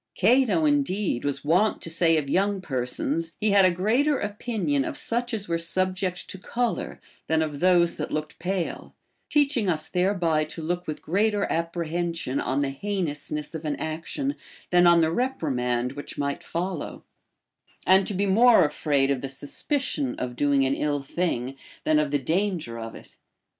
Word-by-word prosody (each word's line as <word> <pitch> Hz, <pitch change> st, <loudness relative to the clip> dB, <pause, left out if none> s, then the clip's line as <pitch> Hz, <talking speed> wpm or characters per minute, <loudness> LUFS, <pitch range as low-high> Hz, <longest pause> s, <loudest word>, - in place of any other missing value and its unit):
Cato 255 Hz, -, +3 dB
indeed 210 Hz, -, +1 dB
was 140 Hz, -1 st, -3 dB
wont 185 Hz, +8 st, +3 dB
to -, -, -4 dB
say 165 Hz, -1 st, +3 dB
of 150 Hz, -2 st, -1 dB
young 195 Hz, +6 st, +1 dB
persons, 145 Hz, +2 st, -2 dB
he 215 Hz, -1 st, +2 dB
had 200 Hz, -1 st, +6 dB
a -, -, +6 dB
greater 235 Hz, -, +2 dB
opinion 235 Hz, +6 st, -1 dB
of 305 Hz, -1 st, -4 dB
such 240 Hz, -3 st, -1 dB
as 215 Hz, -3 st, -2 dB
were 170 Hz, 0 st, 0 dB
subject 185 Hz, +1 st, -1 dB
to 190 Hz, -, -8 dB
color 240 Hz, +4 st, -2 dB, 0.3 s
than 160 Hz, 0 st, +2 dB
of 150 Hz, -2 st, -4 dB
those 175 Hz, -1 st, +4 dB
that -, -, -3 dB
looked 155 Hz, 0 st, -4 dB
pale; 180 Hz, 0 st, -3 dB, 0.3 s
teaching 280 Hz, -8 st, +2 dB
us 155 Hz, -2 st, 0 dB
thereby 180 Hz, -4 st, +1 dB
to 155 Hz, +1 st, -7 dB
look 175 Hz, +2 st, -2 dB
with 155 Hz, -, -5 dB
greater 205 Hz, +3 st, +1 dB
apprehension 165 Hz, -3 st, -2 dB
on 140 Hz, -, 0 dB
the 140 Hz, -1 st, 0 dB
heinousness 150 Hz, -3 st, -3 dB
of 160 Hz, -1 st, -6 dB
an 150 Hz, -2 st, -1 dB
action 165 Hz, -, -3 dB, 0.4 s
than 175 Hz, 0 st, +6 dB
on 170 Hz, -1 st, +6 dB
the 160 Hz, 0 st, +2 dB
reprimand 130 Hz, -, -1 dB
which 145 Hz, +1 st, -8 dB
might 140 Hz, 0 st, -2 dB
follow, 180 Hz, 0 st, -4 dB, 0.8 s
and 190 Hz, +1 st, +5 dB
to 205 Hz, -, -2 dB
be 200 Hz, +2 st, +1 dB
more 220 Hz, -1 st, +6 dB
afraid 140 Hz, -2 st, +1 dB
of 135 Hz, -2 st, -1 dB
the 135 Hz, -, -4 dB
suspicion 265 Hz, -, -2 dB
of 125 Hz, -1 st, -4 dB
doing 140 Hz, 0 st, +2 dB
an 135 Hz, -, +1 dB
ill 145 Hz, -1 st, -1 dB
thing 135 Hz, -5 st, -2 dB, 0.3 s
than 155 Hz, -1 st, +3 dB
of 150 Hz, -1 st, 0 dB
the 145 Hz, -, +1 dB
danger 160 Hz, -, -1 dB
of 115 Hz, 0 st, -7 dB
it. -, -, -14 dB
170 Hz, 170 wpm, -25 LUFS, 150-205 Hz, 0.8 s, had